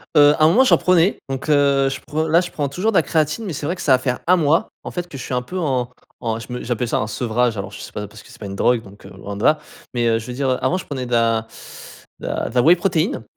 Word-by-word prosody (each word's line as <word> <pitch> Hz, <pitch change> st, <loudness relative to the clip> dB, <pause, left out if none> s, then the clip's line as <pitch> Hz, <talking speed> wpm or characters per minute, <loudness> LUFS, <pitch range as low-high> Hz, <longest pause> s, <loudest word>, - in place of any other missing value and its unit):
Heu, 145 Hz, 0 st, +7 dB
un 155 Hz, -, +6 dB
moment 235 Hz, +10 st, +5 dB
j'en 260 Hz, -, +5 dB
prenais, 180 Hz, +1 st, +3 dB
donc, 135 Hz, +3 st, -5 dB
heu 140 Hz, -2 st, +3 dB
je 135 Hz, -, -5 dB
prend 155 Hz, +2 st, -1 dB
là 165 Hz, +2 st, +4 dB
je 175 Hz, -, -6 dB
prends 145 Hz, -2 st, -2 dB
toujours 185 Hz, +10 st, -1 dB
de 200 Hz, -, +2 dB
la -, -, +6 dB
créatine, 155 Hz, +7 st, -1 dB
mais 185 Hz, -, -4 dB
c'est 145 Hz, -, -5 dB
vrai 170 Hz, +5 st, -1 dB
que -, -, -9 dB
ça 135 Hz, -, +4 dB
va -, -, +6 dB
faire 125 Hz, -1 st, -2 dB
1 180 Hz, -, +6 dB
mois, 160 Hz, -2 st, +2 dB
en -, -, -6 dB
fait 175 Hz, -1 st, -4 dB
que 140 Hz, -, -8 dB
je 130 Hz, -, -7 dB
suis -, -, -5 dB
un 125 Hz, -, +1 dB
peu 180 Hz, +10 st, -7 dB
en 130 Hz, -8 st, -1 dB, 0.3 s
en 115 Hz, -2 st, -2 dB
je 115 Hz, +2 st, -8 dB
me 125 Hz, -, -5 dB
j'appelle 120 Hz, 0 st, -2 dB
ça -, -, 0 dB
un 105 Hz, -, -2 dB
sevrage, 120 Hz, 0 st, 0 dB
alors 100 Hz, -, -5 dB
je -, -, -10 dB
sais -, -, -9 dB
pas 105 Hz, 0 st, -5 dB
parce 105 Hz, +1 st, -14 dB
que -, -, -18 dB
c'est -, -, -14 dB
pas 105 Hz, -, -7 dB
une 100 Hz, 0 st, -6 dB
drogue, 120 Hz, +2 st, +2 dB
donc, 100 Hz, 0 st, -15 dB
heu, -, -, -12 dB
loin 100 Hz, +1 st, -8 dB
de 105 Hz, -, -5 dB
là, 155 Hz, -, +5 dB, 0.4 s
mais, 120 Hz, -1 st, +1 dB
heu, 115 Hz, 0 st, +2 dB
je 110 Hz, -, -10 dB
veux 125 Hz, -, -5 dB
dire, 135 Hz, +1 st, -1 dB
heu, 130 Hz, -, +1 dB
avant 185 Hz, -, +2 dB
je 185 Hz, -, -7 dB
prenais 130 Hz, -3 st, -5 dB
de 125 Hz, -, -10 dB
la 115 Hz, -1 st, +2 dB, 0.7 s
de -, -, -7 dB
la -, -, -2 dB
de -, -, -11 dB
la 125 Hz, -, +5 dB
whey 165 Hz, +7 st, +6 dB
protéine, 175 Hz, 0 st, 0 dB
135 Hz, 325 wpm, -20 LUFS, 120-160 Hz, 0.7 s, Heu